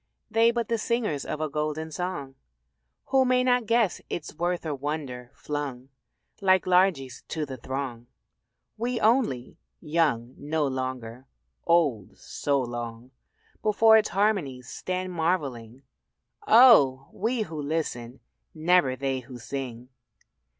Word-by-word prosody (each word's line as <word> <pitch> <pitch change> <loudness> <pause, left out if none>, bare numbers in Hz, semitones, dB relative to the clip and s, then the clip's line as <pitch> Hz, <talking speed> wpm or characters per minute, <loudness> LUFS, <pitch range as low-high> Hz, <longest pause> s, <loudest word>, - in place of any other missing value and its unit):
They 225 +1 +5
but 235 0 -1
the 230 -1 0
singers 215 - -1
of 155 - -4
a 155 - 0
golden 155 +2 -3
song 155 -5 -4 0.8
Who 265 -1 +4
may 250 0 +3
not 250 -3 +2
guess 230 -5 +2
its 165 - -5
worth 175 +2 -2
or 155 - -2
wonder 140 -3 -5
flung 140 -3 -5 0.5
Like 190 -1 +4
largesse 180 -9 +2
to 155 -2 -3
the 135 -2 -7
throng. 130 -1 -5 0.7
We 240 +2 -2
only, 220 - +1 0.2
young 145 -7 0
no 150 +1 -1
longer, 130 -2 -4 0.4
old 150 - +1
so 140 -1 -1
long 120 0 -5 0.5
Before 220 +1 +5
its 215 -1 +4
harmonies, 175 - 0
stand 185 0 -4
marvelling 140 -8 -2 0.6
Oh! 145 - +6
we 225 +3 -1
who 160 -6 -6
listen 135 -5 -3 0.3
never 160 -4 +3
they 135 0 -2
who 125 0 -10
sing. 125 -1 -6
150 Hz, 125 wpm, -26 LUFS, 130-190 Hz, 0.8 s, Oh